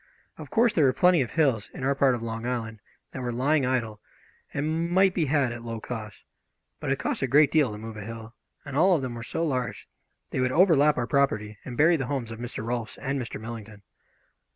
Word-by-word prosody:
Of - - -8
course, 230 -1 +3
there 155 - +4
were 130 - +4
plenty 180 -1 +4
of 120 - -3
hills 135 -10 +1
in - - -6
our 135 +1 +2
part 135 -2 +3
of 115 - -6
Long 115 0 -4
Island 115 -3 -3 0.3
that 130 - -6
were 120 -1 -2
lying 135 +3 +1
idle 115 -5 -1 0.5
and 160 +3 -1
might 190 +1 +4
be 170 -4 +1
had 140 -3 +1
at 120 -1 -7
low 115 -1 -5
cost, 110 -3 -7 0.6
but - - -2
it - - +1
costs - - -2
a - - +1
great 145 0 +5
deal 150 -7 +3
to 105 - -6
move 110 0 -8
a - - -6
hill, 115 +1 -8 0.3
and 140 -2 -7
all 180 +5 +5
of 145 - -1
them 125 -2 -3
were 120 - -7
so 165 +8 -2
large 130 -5 -3 0.4
they - - -2
would 130 0 +1
overlap 150 -3 +4
our 125 - 0
property 110 -6 0
and 125 -2 -7
bury 165 +3 +5
the 135 -4 -3
homes 130 -5 -3
of 115 - -7
Mr. 120 -2 -5
Rolfs 120 -1 -3
and 135 -1 -2
Mr. 120 - -6
Millington. 110 -2 -9
130 Hz, 230 wpm, -26 LUFS, 115-150 Hz, 0.6 s, great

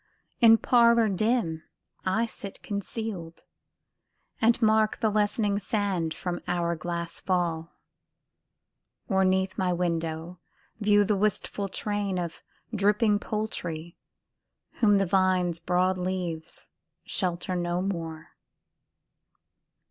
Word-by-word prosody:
In 225 -1 +8
parlour 235 -2 +4
dim 195 -5 0 0.5
I 220 +5 +2
sit 200 -3 -9
concealed, 200 -4 -5 1.0
And 230 +1 +4
mark 220 -1 +3
the 220 -2 +2
lessening 205 -1 +1
sand 195 -5 -1
from 180 -2 -4
hour 170 -1 0
glass 170 +1 -4
fall; 170 -3 -1 1.3
Or 190 -3 +2
'neath 190 0 +1
my 185 -1 +1
window 165 0 -2 0.4
view 205 -1 +4
the 210 +1 +1
wistful 200 0 -1
train 205 -1 -2
Of 170 -2 -4 0.3
dripping 210 +1 +3
poultry, 170 -7 -4 0.8
whom 205 -3 +5
the 195 - +2
vine's 185 -2 +2
broad 180 +2 +1
leaves 180 -3 -4 0.4
Shelter 180 -1 -2
no 175 0 -1
more. 165 -5 -4
190 Hz, 100 wpm, -27 LUFS, 175-210 Hz, 1.3 s, In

